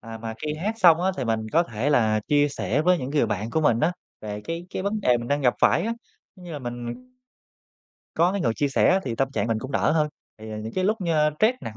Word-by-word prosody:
À, 115 -1 -9
mà 110 0 -6
khi 150 0 -2
hát 200 +8 -2
xong 170 -5 +6
á, 185 +2 +2
thì 130 - -2
mình 115 -1 0
có 165 - +5
thể 120 -2 -2
là 110 -5 +3
chia 145 0 +3
sẻ 145 0 -1
với 180 +1 +3
những 130 -2 -4
người 145 -5 +2
bạn 105 +1 -3
của 160 - +1
mình 120 -7 +2
á, 165 +3 +2 0.3
về 105 -1 -6
cái 165 +1 -5
cái 185 - -4
vấn 205 +2 -1
đề 125 -10 +3
mình 120 0 -6
đang 145 +1 +1
gặp 125 -3 +3
phải 170 - +4
á. 225 +4 -1 0.4
Giống 180 - -14
như 175 - -8
là 150 - -4
mình 120 - -7 1.1
có 175 +3 +3
cái 200 - -2
người 115 -8 +1
chia 145 - 0
sẻ 135 - +3
á, 190 +1 +3
thì 120 - -3
tâm 135 +3 0
trạng 140 - -1
mình 115 -1 0
cũng 130 +5 -7
đỡ - - +2
hơn. 155 -1 +2 0.3
Thì, 110 0 -9
à, 110 - -5
những 110 +1 -6
cái 185 - 0
lúc 215 +3 +1
như 170 -3 0 0.2
stress 220 +4 +4
nặng 110 - -7
145 Hz, 280 wpm, -24 LUFS, 115-175 Hz, 1.1 s, xong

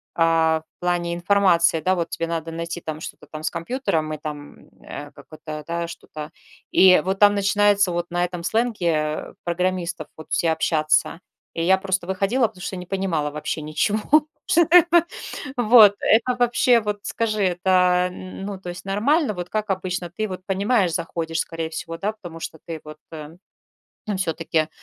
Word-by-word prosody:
а, 165 -1 +3 0.2
в - - -
плане 175 -1 0
информации, 175 -2 +3
да, 185 +4 +2
вот 170 -1 -2
тебе 165 - -2
надо 165 -1 -3
найти 170 +1 -5
там 155 0 -6
что-то - - -9
там 155 - -7
с 155 - 0
компьютером 165 - -2
и 155 - -4
там, 150 -1 -7
м, - - -20
э, 145 0 -8
какой-то, 155 -1 -9
да, 170 0 -2
что-то, 155 -2 -9 0.4
и 185 -3 +6
вот 190 +1 0
там 205 0 +7
начинается 200 -1 +3
вот 175 0 -2
на 175 0 0
этом 175 -1 -6
сленге, 220 -3 0
э, 155 0 -2
программистов 175 -2 -2
вот 155 - -11
все 165 - +2
общаться. 155 0 +1 0.3
И 165 - -2
я 190 +2 +5
просто 190 -2 -2
выходила, 200 +6 +1
потому 185 -4 -15
что 190 - -5
не 180 - -7
понимала 185 -6 -1
вообще 150 +1 -4
ничего. 155 +8 0 0.5
Что 345 -3 +4
такое? 345 +1 +5 0.5
Вот, 220 -3 +7
это 245 +3 +3
вообще, 240 0 +4
вот, 210 -1 -3
скажи, 215 -3 -1
это, 180 -1 -1 0.4
а, - - +1
н 185 +1 -8
ну, 200 -2 -5
то 180 - -8
есть 175 +2 -8
нормально? 225 - +1
Вот 180 -1 -6
как 215 -1 -2
обычно, 185 -2 -2
ты 215 +5 -3
вот 185 -1 -6
понимаешь, 195 -2 +1
заходишь, 165 -1 -3
скорее 165 -1 -3
всего, 165 +1 -6
да, 210 +4 -2
потому 175 -6 -10
что 160 - -7
ты, 165 -1 -6
вот, 155 0 -10
э, 155 0 -9 0.7
ну 210 - -1
всё-таки, 165 -3 -1
180 Hz, 180 wpm, -23 LUFS, 165-205 Hz, 0.7 s, там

